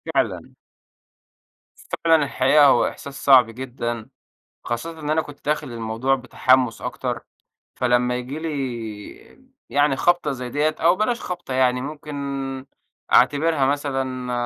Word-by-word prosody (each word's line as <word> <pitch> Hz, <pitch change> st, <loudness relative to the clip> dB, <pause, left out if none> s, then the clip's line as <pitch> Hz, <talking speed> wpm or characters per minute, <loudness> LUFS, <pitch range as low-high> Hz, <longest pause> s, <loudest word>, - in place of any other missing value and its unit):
فعلًا. -, -, -1 dB, 1.5 s
فعلًا 160 Hz, -2 st, +5 dB
الحقيقة 140 Hz, +2 st, +4 dB
هو 135 Hz, -3 st, +5 dB
إحساس 140 Hz, -1 st, -8 dB
صعب 130 Hz, -4 st, +8 dB
جدًا، 120 Hz, -2 st, -5 dB, 0.6 s
خاصةً 160 Hz, +8 st, -4 dB
إن 150 Hz, -1 st, -3 dB
أنا 160 Hz, +1 st, +2 dB
كنت 145 Hz, -1 st, -13 dB
داخل 150 Hz, -1 st, -1 dB
الموضوع 115 Hz, +3 st, 0 dB
بتحمُّس 130 Hz, -2 st, +1 dB
أكتر. -, -, -3 dB, 0.6 s
فلما 125 Hz, 0 st, +2 dB
ييجي 125 Hz, +4 st, -5 dB
لي 130 Hz, -, -6 dB, 0.2 s
يعني 145 Hz, -1 st, +2 dB
خَبطة 175 Hz, +1 st, +2 dB
زي 125 Hz, -2 st, -5 dB
دية 150 Hz, +3 st, 0 dB
أو 170 Hz, +3 st, +4 dB
بلاش 235 Hz, +4 st, 0 dB
خَبطة 175 Hz, -7 st, -5 dB
يعني، 125 Hz, -1 st, +2 dB
ممكن 150 Hz, +2 st, -7 dB, 1.0 s
أعتبرها 145 Hz, +2 st, +4 dB
مثلًا 135 Hz, -3 st, -2 dB
135 Hz, 120 wpm, -22 LUFS, 125-150 Hz, 1.5 s, صعب